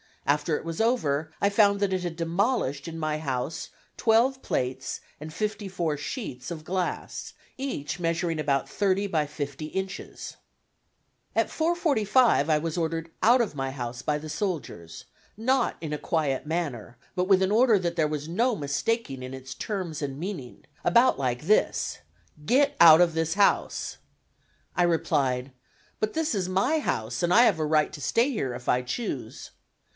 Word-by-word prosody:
After 150 +2 +1
it - - -9
was 165 +4 -3
over 160 - +1
I 200 - +3
found 200 -1 +4
that 200 -2 +1
it 185 - 0
had 175 -2 -4
demolished 165 - 0
in 165 0 -6
my 155 -1 -1
house 135 0 -3 0.3
twelve 245 +4 +3
plates 130 +1 -2 0.2
and 155 +1 -7
fifty 210 +3 -3
four 170 -5 -1
sheets 140 - -5
of 160 -2 -6
glass, 180 +2 -3 0.2
each 165 - -4
measuring 165 -1 -1
about 140 -2 0
thirty 200 0 +1
by 155 -6 0
fifty 145 0 -5
inches. 190 +3 -6 1.0
At - - +2
4:45 260 - +2
1 155 -1 +2
was 165 0 -2
ordered 165 0 -2
out 240 +3 +6
of 225 - -1
my 135 -1 -2
house 120 -2 -5
by 150 -1 0
the 155 +1 -8
soldiers, 150 - -4 0.3
not 255 +3 +1
in 155 -2 -4
a - - -1
quiet 150 -3 -1
manner, 140 -9 -3 0.2
but 180 -1 0
with 190 -1 +5
an 190 - +1
order 230 0 +5
that 170 -2 -2
there 155 -2 +3
was 150 0 -4
no 235 +7 +1
mistaking 140 - -2
its 130 +1 -7
terms 180 -7 -4
and 135 -2 -3
meaning, 170 -9 -6 0.2
about 240 - +4
like 125 -1 -1
this: 210 +6 +1 0.4
"Get 280 - +3
out 165 0 +9
of 170 -2 +4
this 160 +1 0
house!" 200 0 +1 0.8
I 175 - +3
replied: 135 -6 +1 0.5
"But 215 0 -1
this 320 -2 0
is 185 -3 -1
my 225 +13 +2
house 115 - -2
and 175 0 +2
I 235 - +8
have 200 -9 +3
a 155 - +1
right 155 0 +2
to 150 - -8
stay 230 - +2
here 135 - -2
if 125 0 -10
I 125 - +3
choose." 170 - -5
165 Hz, 170 wpm, -27 LUFS, 145-205 Hz, 1.0 s, out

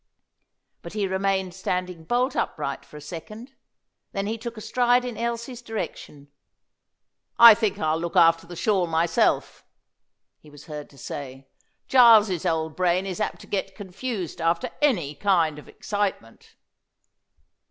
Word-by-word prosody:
But 170 - -10
he 210 -2 -1
remained 190 -1 -1
standing 180 -2 -4
bolt 245 - 0
upright - - -3
for 150 - -13
a - - -10
second. 215 - -9 0.6
Then 195 0 -2
he 220 +2 -2
took 230 +1 -7
a - - -7
stride 245 +2 +2
in 245 -2 -5
Elsie's 235 +2 -4
direction. 180 -10 -7 1.1
"I 235 -1 +11
think 215 -2 -1
I'll 155 -3 0
look 170 0 -5
after 165 0 +4
the 175 - -9
shawl 190 -1 +1
myself," 165 +1 +1 0.8
he 150 - -18
was 145 -1 -14
heard 150 -2 -8
to 140 - -19
say. 135 0 -8 0.4
"Giles's 220 -8 +5
old 160 -1 -1
brain 180 +1 +1
is 190 +1 -4
apt 210 - -3
to - - -12
get 195 -1 -3
confused 195 -1 -5
after 165 +1 0
any 185 - +1
kind 165 -3 +1
of - - -15
excitement." 205 - -4
190 Hz, 145 wpm, -24 LUFS, 165-220 Hz, 1.1 s, I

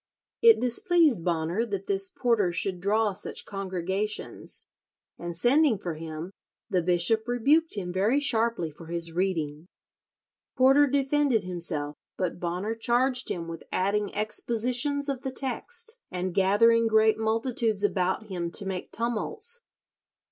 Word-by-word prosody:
It 460 -1 +7
displeased 265 - +3
Bonner 170 +4 0
that 200 -4 -4
this 195 0 0
Porter 225 -7 +1
should 180 +1 -2
draw 210 +1 +1
such - - -5
congregations, 195 +1 -4 0.5
and 170 0 -5
sending 250 - +3
for 175 -3 -4
him, 160 +2 -7 0.4
the 185 - +2
Bishop 180 +6 +2
rebuked 280 +7 +2
him 180 -3 -4
very 210 +9 +2
sharply 230 - +1
for 160 +2 -13
his 170 0 -1
reading. 165 -3 -2 0.9
Porter 270 +3 +5
defended 275 -3 +1
himself, 165 -5 -4 0.2
but 180 -2 -2
Bonner 180 +5 -2
charged 245 +3 +1
him 170 -1 -4
with 165 -1 -7
adding 200 +2 0
expositions 245 +6 -1
of 275 -3 -2
the 265 - -4
text, 450 - -3
and 180 0 -3
gathering 225 +5 +4
"great 220 0 +3
multitudes 225 -1 0
about 190 0 0
him 180 -5 -4
to 200 +4 -1
make 190 -1 -5
tumults." 435 - -3
210 Hz, 135 wpm, -27 LUFS, 180-245 Hz, 0.9 s, It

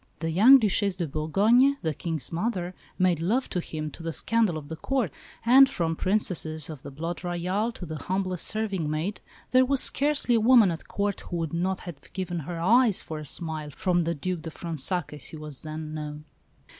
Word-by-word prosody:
The 165 -1 -3
young 225 +11 +8
Duchesse 205 -4 +1
de 175 -3 -3
Bourgogne, 210 - +3
the 160 -1 0
King's 160 -1 -4
mother, 180 0 -2 0.2
made 180 -3 +2
love 225 +11 0
to 180 - -1
him, 155 -3 -5
to - - -11
the 165 0 -3
scandal 220 -1 +1
of 145 -2 -8
the 160 - -6
Court; 245 - -1 0.3
and 265 +3 +7
from 165 -10 -1
Princesses 160 -6 0
of 150 -4 -9
the 140 - -8
Blood 165 +6 -5
Royal 180 +6 -1
to 180 - -8
the 155 -1 -6
humblest 185 -1 -1
serving 200 -7 -1
maid, 160 +7 -3 0.3
there 255 0 +6
was 270 +1 +1
scarcely 285 -3 +2
a 230 - +4
woman 230 -4 +6
at 165 - -7
Court 200 -1 -2
who 175 - -2
would 165 -1 -3
not 185 +3 -1
have 170 -6 -10
given 180 -2 -3
her 165 +2 -6
eyes 225 +4 +4
for 155 -1 -6
a 155 - -8
smile 155 -1 -3
from 180 +3 0
the 170 0 -1
Duc 180 +3 -3
de 165 - -6
Fronsac, 165 +1 -2
as 145 -4 -10
he 160 - -9
was 150 -3 -5
then 155 0 -6
known. 150 -1 -6
175 Hz, 205 wpm, -26 LUFS, 160-205 Hz, 0.3 s, young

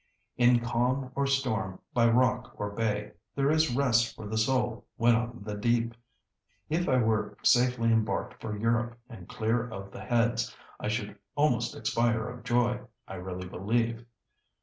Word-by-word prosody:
'In 120 -1 +5
calm 125 +3 0
or 140 +1 0
storm, 110 -9 0 0.2
by 120 -3 +4
rock 125 +1 +2
or 105 0 -3
bay,' 105 -1 -1 0.2
there 140 +1 +2
is 155 -5 +2
rest 120 -4 +2
for 110 - -9
the 110 - -4
soul 120 +1 +1
when 120 +1 +5
on 115 -1 -2
the 105 0 -5
deep. 115 +2 +1 0.8
If 175 +3 0
I 130 - +4
were 110 -2 +1
safely 120 -2 +4
embarked 110 -3 -1
for 105 -2 -4
Europe 115 +2 0
and 100 -7 -11
clear 115 +2 0
of 100 -3 -8
the - - -9
Heads, 120 -1 +1 0.2
I - - -3
should 105 -2 -2 0.2
almost 135 -5 +1
expire 115 -1 +1
of 125 -2 -9
joy, 120 0 +2 0.3
I - - -8
really 90 0 -6
believe." 115 +5 -1
115 Hz, 160 wpm, -29 LUFS, 110-125 Hz, 0.8 s, In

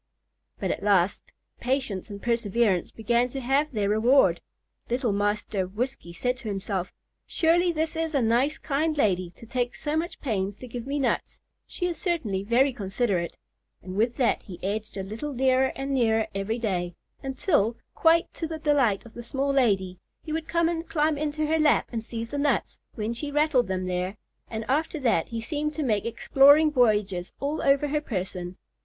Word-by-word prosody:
But - - -1
at - - -3
last 200 -2 +2 0.3
patience 250 -7 -2
and 200 -1 -7
perseverance 230 -4 +1
began 235 +2 +1
to 270 - -5
have 275 +4 +1
their 210 -5 0
reward. 230 +7 +4 0.5
Little 245 -1 +1
Master 205 -1 -1
Whiskey 230 -1 -4
said 250 +8 -1
to 240 -2 -9
himself, 195 -2 -3 0.4
"Surely 345 +2 +3
this 320 0 -2
is 325 -1 -2
a 275 - +3
nice, 245 +7 +2
kind 305 +1 -1
lady, 185 -8 +1
to - - -13
take 245 +1 -2
so 295 0 -2
much 335 +2 -2
pains 200 -6 -2
to 255 - -10
give 240 +1 -6
me 285 +1 -1
nuts; 265 -4 -1 0.3
she 355 - -3
is 350 -2 -2
certainly 280 - -1
very 245 +6 +3
considerate;" 195 -4 -1 0.5
and 185 +1 -7
with 230 +4 +1
that 250 -4 +2
he 180 -3 -10
edged 210 +2 -3
a 195 - -2
little 225 +10 -5
nearer 260 +1 +3
and 275 +1 -3
nearer 225 -4 +2
every 195 +4 -2
day, 180 -7 -2 0.3
until, 260 - +1 0.2
quite 330 +1 +4
to 325 - -4
the 320 0 -5
delight 280 -10 +2
of 230 - -13
the 240 - -7
small 275 +3 -1
lady, 195 -9 +1 0.2
he 310 - -5
would 320 0 -3
come 335 -1 +2
and 330 -1 -3
climb 310 -1 +2
into 305 +1 -1
her 320 +1 +1
lap 305 -1 +3
and 225 -2 -3
seize 230 0 -6
the 285 - -2
nuts, 290 0 0 0.2
when 220 0 -2
she 285 +5 -5
rattled 290 -4 +2
them 185 -1 -2
there, 185 +2 -2 0.3
and 220 -1 -4
after 310 +4 0
that 230 - +2
he 230 - -3
seemed 300 +5 -3
to 310 - -1
make 215 -6 0
exploring 285 +6 +5
voyages 210 -8 +2
all 285 +3 -2
over 280 +1 +3
her 300 +1 0
person. 185 -7 -4
240 Hz, 185 wpm, -26 LUFS, 205-290 Hz, 0.5 s, exploring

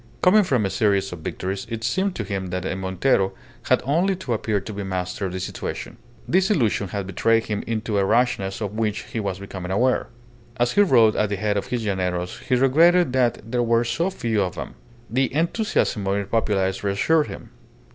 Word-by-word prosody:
Coming 205 +4 +6
from 130 - +1
a 95 - -1
series 100 -4 +1
of 90 - -7
victories, 95 +6 -4
it 115 -1 -5
seemed 190 - 0
to 110 - -3
him 95 -2 -3
that 90 0 -4
a 95 - -2
Montero 95 +2 +1 0.4
had - - +3
only 175 +8 +2
to 175 -10 -3
appear 110 -2 0
to 100 +3 -8
be 100 - -5
master 95 +1 -3
of - - -6
the 95 - -4
situation. 90 - -5 0.3
This 190 +2 +2
illusion 115 - +1
had 100 +1 -4
betrayed 115 +4 +2
him 105 -1 -3
into 110 -2 -1
a - - +3
rashness 115 -3 +1
of 105 -2 -2
which 110 -1 -1
he 115 - -5
was 100 -3 -2
becoming 95 -2 -7
aware. 125 +7 +1 0.5
As 120 0 +2
he 205 - +4
rode 120 - +5
at 105 - +1
the 100 - -1
head 105 +1 -1
of 100 - -2
his 120 -3 -2
llaneros 90 -3 -2
he 125 - 0
regretted 160 +5 +4
that 120 -3 0
there 125 -1 +1
were 115 0 +2
so 135 +10 0
few 115 - -1
of 90 -2 -2
them. - - -6 0.3
The 130 +3 0
enthusiasm 165 - 0
of 100 +1 +1
the 100 - -2
populace 95 -3 0
reassured 145 +11 +2
him. - - -9
110 Hz, 205 wpm, -23 LUFS, 95-125 Hz, 0.5 s, Coming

